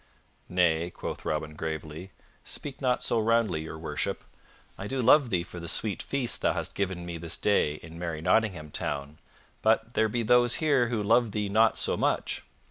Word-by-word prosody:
"Nay," 85 -2 +2
quoth - - -7
Robin 75 0 -2
gravely. 80 +2 -5 0.3
"Speak 140 -1 -5
not 125 -2 +1
so 115 - +1
roundly, 110 -7 +2
Your 80 0 -7
Worship. 80 - -3 0.5
I 95 - -6
do 135 +4 -2
love 130 +2 +5
thee 90 -4 +1
for 85 - -9
the 85 - -7
sweet 105 +4 +1
feast 135 -4 -2
thou - - +2
hast - - -3
given 95 -3 -2
me 85 -1 -5
this 85 0 -1
day 90 -8 +2
in 80 +1 -10
merry 85 -3 -3
Nottingham 90 -3 +1
Town; 70 +3 -4 0.4
but 110 +1 +2
there 110 -2 +2
be 120 +2 -1
those 120 +1 +4
here 140 -6 +2
who 115 -3 -1
love 115 0 +3
thee 105 -2 -1
not 110 +2 +4
so - - 0
much. - - 0
100 Hz, 185 wpm, -28 LUFS, 80-115 Hz, 0.5 s, love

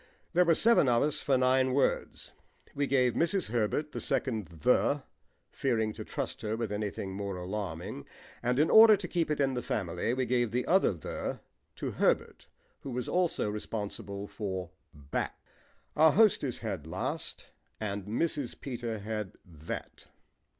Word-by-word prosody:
There 180 +1 +5
were 165 -1 +4
seven 225 - +5
of 120 -1 +4
us 150 0 0
for 135 -2 +2
nine 130 0 +3
words. 140 - 0 0.4
We 145 0 0
gave 125 -3 +3
Mrs. 170 - +1
Herbert 120 +6 0
the - - -5
second 110 - -1
"the," 80 -2 +1 0.5
fearing 110 -5 0
to - - -7
trust - - -4
her 110 0 -2
with 115 -3 -3
anything 105 -2 -3
more 100 0 -4
alarming 90 -4 -5 0.3
and 125 +1 0
in 150 +3 +3
order 220 -1 +9
to 190 -2 -6
keep 170 -2 0
it 150 - 0
in 135 -1 +2
the 125 - -2
family 95 +2 -1
we 130 0 0
gave 120 -1 +1
the 125 +3 -1
other 190 +2 +4
"the" 85 - -5 0.3
to - - -4
Herbert, - - 0 0.3
who 140 - -8
was 125 -1 -3
also 180 -10 +1
responsible 105 -1 -4
for 95 -3 -5 0.2
"back." 70 -4 -4 0.6
Our 155 -1 +6
hostess 195 - +4
had 100 -9 -5
"last" 80 - -4 0.3
and 100 -2 -3
Mrs. 140 +4 -1
Peter 120 -4 -4
had 105 -1 -4
"that." 80 -3 -8
115 Hz, 155 wpm, -30 LUFS, 100-140 Hz, 0.6 s, order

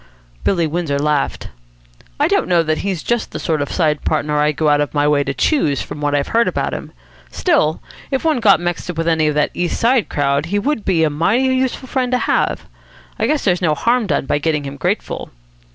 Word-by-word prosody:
Billy 170 -4 +1
Windsor 160 -2 -1
laughed. 140 -8 -1 0.7
"I - - +3
don't - - +1
know 175 -2 +3
that 155 -1 -1
he's 190 -5 -3
just 240 -1 -1
the - - -6
sort 155 -3 -1
of 145 - -3
side 155 -4 0
partner 150 0 0
I'd 150 0 +2
go 155 - +1
out 145 0 +4
of 145 - -3
my 145 0 +2
way 145 -1 +3
to 140 - -2
choose, 150 - +1
from 150 0 -8
what 145 0 0
I've 140 -1 0
heard 230 +1 +2
about - - -1
him. - - -6 0.4
Still, 285 - +1 0.3
if 270 +2 -2
one 310 -5 +2
got 210 -4 +5
mixed 175 0 -3
up 175 - -4
with 165 0 -1
any 160 -2 +2
of 150 - 0
that 150 -1 +1
East 175 -1 -2
Side 235 -1 +2
crowd, 140 +1 0
he 200 +4 -1
would 225 +1 -1
be 170 -4 +2
a 155 - +2
mighty 170 - +1
useful 260 0 -1
friend 255 -1 -1
to - - +4
have. - - 0 0.5
I - - +1
guess 305 -1 0
there's 180 -2 +2
no 155 -4 +2
harm 235 +4 +1
done 145 -5 0
by 145 - 0
getting 150 -1 0
him 140 0 -6
grateful." - - -2
160 Hz, 230 wpm, -18 LUFS, 150-215 Hz, 0.7 s, got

